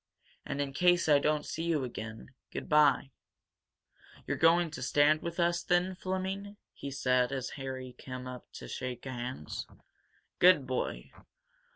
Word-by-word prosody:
And, 140 - -3
in 140 -1 -2
case 175 +2 +4
I 145 -2 +6
don't 150 +1 +1
see 160 - -4
you 160 -5 +1
again, 115 0 -7 0.2
good - - -6
bye!" 150 -3 +4 1.1
"You're - - -1
going 165 +1 +4
to - - -7
stand 145 +4 +4
with 170 +1 -5
us, 175 0 +2
then, 180 +2 +2
Fleming?" 190 +2 -4 0.2
he 140 - -6
said, 125 -2 +2
as 135 -2 -3
Harry 130 -2 -6
came 130 0 -7
up 125 -1 -9
to - - -8
shake 125 -1 -5
hands. 125 - -5 0.7
"Good 180 -6 +6
boy! 125 - -3
145 Hz, 150 wpm, -31 LUFS, 130-170 Hz, 1.1 s, I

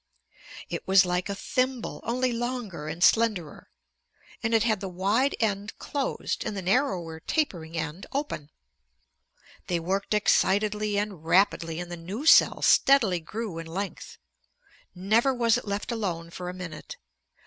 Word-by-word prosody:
It - - -5
was 190 -1 +6
like 180 +2 -1
a 200 - -2
thimble, 255 +3 -2
only 250 +1 0
longer 235 -10 -4
and 165 +3 -3
slenderer, 215 -9 +2 0.7
and 225 - -1
it 220 - +4
had 220 -4 +1
the 195 - -5
wide 205 +10 +1
end 205 -1 -1
closed 280 -2 -3
and 205 - -4
the 190 - -4
narrower 180 - 0
tapering 170 - -2
end 160 +3 -4
open. 275 - -3 1.2
They 175 -1 0
worked 195 +5 -1
excitedly 210 0 +2
and 200 -6 -3
rapidly, 165 -1 +2
and 175 0 -6
the 175 - -5
new 195 - -6
cell - - +6
steadily 230 -10 +4
grew 195 +1 -5
in 165 - -7
length. 190 +4 -6 0.8
Never 220 +8 +2
was 235 -2 +3
it - - -13
left 200 +4 -3
alone 175 -7 -3
for 180 +1 -6
a - - -3
minute. 180 -4 -8
200 Hz, 150 wpm, -27 LUFS, 175-230 Hz, 1.2 s, was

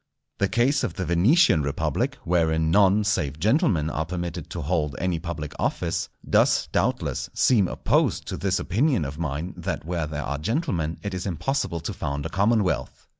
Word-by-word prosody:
The 100 - +3
case 125 +7 +2
of - - -2
the 95 - -3
Venetian 95 - +4
Republic, 70 -1 -1
wherein 80 -2 +1
none 100 +2 +4
save 75 -8 -1
gentlemen 105 - +2
are 80 - -1
permitted 85 -2 -4
to 85 - -5
hold 75 -2 -1
any 90 -2 -1
public 80 -4 -5
office, - - -1 0.2
does, - - +3
doubtless, - - -1
seem 105 -7 +4
opposed - - +1
to - - -3
this 95 -1 0
opinion 115 - +1
of 70 +3 -6
mine 80 +2 -3
that - - -4
where 85 -2 -2
there 75 -1 -4
are 70 - -3
gentlemen 90 - -1
it 100 -1 -4
is 90 +1 -3
impossible 90 - -2
to 80 - -4
found 70 0 -4
a - - -2
commonwealth. 100 +1 0
85 Hz, 175 wpm, -25 LUFS, 80-100 Hz, 0.2 s, Venetian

